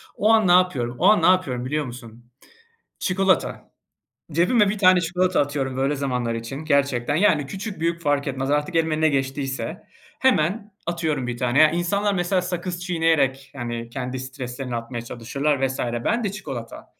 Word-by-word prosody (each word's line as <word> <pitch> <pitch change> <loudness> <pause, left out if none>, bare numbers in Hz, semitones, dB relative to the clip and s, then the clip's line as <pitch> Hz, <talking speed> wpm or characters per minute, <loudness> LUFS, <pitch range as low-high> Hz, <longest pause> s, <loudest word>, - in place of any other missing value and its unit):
O 210 - +1
an 220 -3 +4
ne - - +5
yapıyorum? 155 -10 +2
O 175 - +1
an 210 +2 +6
ne - - +2
yapıyorum 140 -10 +2
biliyor 150 +3 -1
musun? 120 -1 -11 0.7
Çikolata. 190 0 0 0.6
Cebime 195 +7 +3
1 210 +1 -2
tane 185 -2 +6
çikolata 180 +2 +1
atıyorum 140 -2 -2
böyle 135 +2 0
zamanlar 125 -4 -1
için 115 +3 -5
gerçekten. 140 -2 +1
Yani, 155 -6 +3
küçük 195 +5 -6
büyük 170 +1 0
fark 145 -2 +1
etmez 135 0 -2
artık 150 +4 0
elime 160 -1 +1
ne 160 - +4
geçtiyse 135 -1 -3 0.3
hemen 210 -3 +1
atıyorum 160 -6 -1
1 120 -1 -3
tane. 130 +5 +4
İnsanlar 200 +4 0
mesela 180 0 +1
sakız 180 0 -4
çiğneyerek, 160 -6 +1
yani, 120 -2 -5
kendi 125 +1 -4
streslerini 130 -1 -5
atmaya 115 0 -5
çalışırlar 135 +4 -1
vs. 130 0 -4
Ben 120 - -1
de 200 - -1
çikolata. 135 - -7
145 Hz, 160 wpm, -23 LUFS, 130-180 Hz, 0.7 s, an